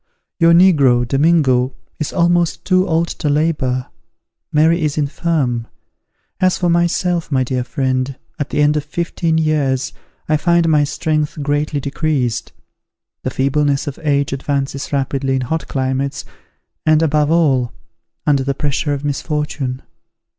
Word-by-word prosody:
Your 165 0 +5
negro, 145 -9 +5
Domingo, 135 -3 +2 0.2
is 155 - -2
almost 175 -1 +1
too 185 0 +3
old 165 0 +1
to 150 - -3
labor; 145 -4 0 0.7
Mary 160 +3 +3
is 150 -1 -1
infirm. 140 -5 -1 0.7
As 185 -1 +2
for 175 -1 +1
myself, 170 0 0
my 130 -2 +2
dear 125 0 -2
friend, 130 0 -2 0.2
at 145 - -2
the 150 - +1
end 150 +1 +3
of 150 - 0
fifteen 165 +1 -1
years, 145 -4 0 0.3
I 155 - +2
find 170 +2 +2
my 150 -2 +3
strength 155 0 -2
greatly 145 +1 0
decreased; 140 -4 -1 0.7
the - - -2
feebleness 140 +1 0
of 145 -3 -6
age 140 -3 +1
advances 140 0 -3
rapidly 135 -1 0
in 130 - 0
hot 145 +3 -3
climates, 135 +1 -2 0.6
and, 155 0 +3
above 150 -1 +2
all, 140 -7 +2 0.5
under 140 -2 +2
the 140 0 -1
pressure 145 +1 -1
of 140 +1 -6
misfortune. 145 -3 -3
145 Hz, 140 wpm, -18 LUFS, 135-160 Hz, 0.7 s, Your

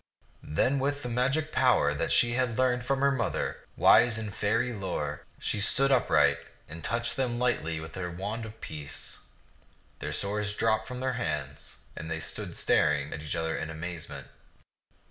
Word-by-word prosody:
Then 130 - +1
with 145 +1 -1
the 125 - -3
magic 135 +6 0
power 125 - +3
that 70 - -2
she 120 - +5
had 120 -2 0
learned 125 -1 +2
from 135 +2 0
her 140 0 +4
mother, 120 -5 -1 0.2
wise 120 -2 +6
in 110 -2 -4
Faerie 115 +5 0
lore, 85 -8 -4
she - - -2
stood 135 +6 +4
upright 130 -3 +4 0.3
and 80 +2 -9
touched 120 0 -1
them 125 -3 -1
lightly 80 -10 0
with 80 0 -8
her 90 -1 -4
wand 105 +6 -4
of 110 +1 -12
peace. 75 -2 -5 0.8
Their - - -4
swords 105 +1 +1
dropped 110 0 +1
from 125 -1 -6
their 130 0 0
hands, 75 - -4 0.2
and 80 - -6
they 80 0 -2
stood - - -3
staring 70 +1 +2
at 75 - -6
each 75 0 -4
other 80 0 -1
in 80 - -4
amazement. 85 +1 -6
110 Hz, 170 wpm, -29 LUFS, 80-125 Hz, 0.8 s, wise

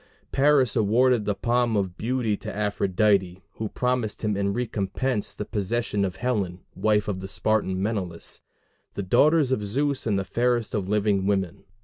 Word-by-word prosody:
Paris 135 -3 +3
awarded 115 +2 +3
the 105 - 0
palm 120 0 +1
of 95 -3 -1
beauty 115 -1 -1
to - - -7
Aphrodite, 100 -2 +1 0.2
who 110 -1 -3
promised 125 -4 -2
him 105 -1 0
in 100 0 0
recompense 115 +1 -2
the 105 - -4
possession 105 0 -1
of 95 -2 -2
Helen, 100 -8 -2
wife 105 -1 +1
of 100 -3 -2
the 95 - -6
Spartan 100 -2 0
Menelaus, 95 -5 -4 0.5
the 100 - -3
daughter 150 - +4
of 130 -7 +1
Zeus 135 +5 -1
and 105 -3 +1
the 95 - -2
fairest 120 +1 0
of 100 -4 -1
living 100 -2 +1
women. 95 -4 -1
105 Hz, 160 wpm, -25 LUFS, 100-120 Hz, 0.5 s, daughter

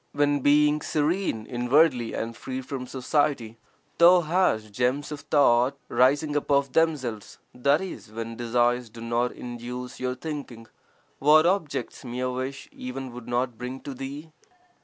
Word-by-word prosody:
When, 145 0 +2
being 150 +2 +4
serene 150 - -1
inwardly 125 0 +2
and 115 +1 -4
free 130 +2 -5
from 130 -1 -6
society, 130 -4 -1 0.4
thou 175 +1 +7
hast 155 - +1
gems 125 +7 -1
of 150 - -5
thought 135 -2 +3
rising 145 +4 +2
up 145 - -1
of 140 -2 +2
themselves 135 -10 0 0.2
(i.e., 145 +9 0
when 115 +1 -5
desires 120 +1 +1
do 115 +2 -13
not 120 +1 0
induce 125 +1 -7
your 125 0 -2
thinking), 135 -5 -7 0.5
what 155 +3 +6
objects 180 -4 -1
mere 125 +1 -3
wish 130 +2 -5
(even) 130 0 -6
would 120 -1 -10
not 120 -1 -1
bring 125 +2 -5
to 140 - -6
thee? 140 +4 -7
130 Hz, 140 wpm, -26 LUFS, 120-145 Hz, 0.5 s, thou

